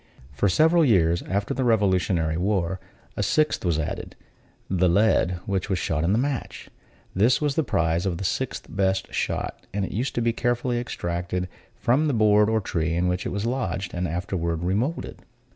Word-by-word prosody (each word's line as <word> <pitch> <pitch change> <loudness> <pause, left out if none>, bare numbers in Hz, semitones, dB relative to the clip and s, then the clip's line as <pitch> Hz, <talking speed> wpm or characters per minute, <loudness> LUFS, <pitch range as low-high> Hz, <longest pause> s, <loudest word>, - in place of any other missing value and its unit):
For 95 +8 +1
several 160 - +4
years 85 - +3
after 100 +2 -1
the 130 - -1
revolutionary 95 -7 +2
war, 90 0 0 0.4
a - - -2
sixth 150 +10 +1
was 85 -4 +1
added: 80 - -4 0.5
the 90 -1 +2
lead 90 -1 +3
which 100 -1 -2
was 95 - +1
shot 80 -2 -1
in 85 - +2
the 105 - +3
match. 135 +1 -3 0.4
This 110 +7 +3
was 150 -2 0
the 160 - +1
prize 85 - 0
of 85 -3 -1
the 100 - -5
sixth 130 +7 -2
best 95 -1 -1
shot; - - -3
and 100 -1 -1
it - - -7
used 125 +6 -2
to 120 - 0
be 115 0 +1
carefully 120 0 0
extracted 90 -4 -3 0.3
from 140 +6 +2
the 140 - +1
board 105 -1 +4
or 110 0 +2
tree 85 -3 -1
in 90 +1 +1
which 90 0 -2
it - - -4
was 100 +2 -2
lodged, 100 -7 -2
and 90 0 -1
afterward 85 -1 -2
remoulded. 110 - -2
95 Hz, 185 wpm, -25 LUFS, 90-115 Hz, 0.5 s, several